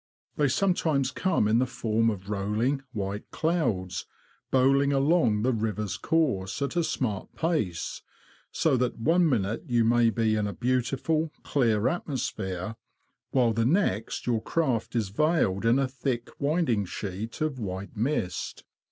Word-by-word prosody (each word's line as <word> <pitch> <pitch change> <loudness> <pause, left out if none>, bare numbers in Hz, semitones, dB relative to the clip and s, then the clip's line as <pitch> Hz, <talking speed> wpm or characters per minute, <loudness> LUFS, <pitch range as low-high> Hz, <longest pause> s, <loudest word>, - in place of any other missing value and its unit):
They 150 - +2
sometimes 155 -4 +1
come 165 - +1
in 110 +2 +3
the 130 - +2
form 115 -2 +1
of 100 -3 -5
rolling, 105 +7 0
white 100 -2 -4
clouds, 115 - -1 0.4
bowling 135 +2 +4
along 135 -6 +3
the 130 +1 +2
river's 105 -3 -2
course 130 -13 0
at 140 - -3
a 170 - +2
smart 110 -10 -2
pace, 150 - -1 0.5
so 155 -5 +2
that 125 0 0
one 165 +7 +3
minute 110 -4 -1
you 120 -2 +2
may 120 0 +4
be 110 -1 +1
in 105 -1 0
a 100 - -4
beautiful, 135 +6 0
clear 115 -5 +2
atmosphere, 110 - -3 0.5
while 120 -4 +3
the 115 +1 +1
next 120 - 0
your 115 -3 +1
craft 130 -8 -1
is 110 -5 0
veiled 115 - +1
in 120 +3 +5
a 135 -1 +2
thick 125 -2 -3
winding 140 - +1
sheet 100 - -5
of 155 -4 -1
white 100 0 -5
mist. 110 -6 -2
120 Hz, 145 wpm, -27 LUFS, 105-140 Hz, 0.5 s, in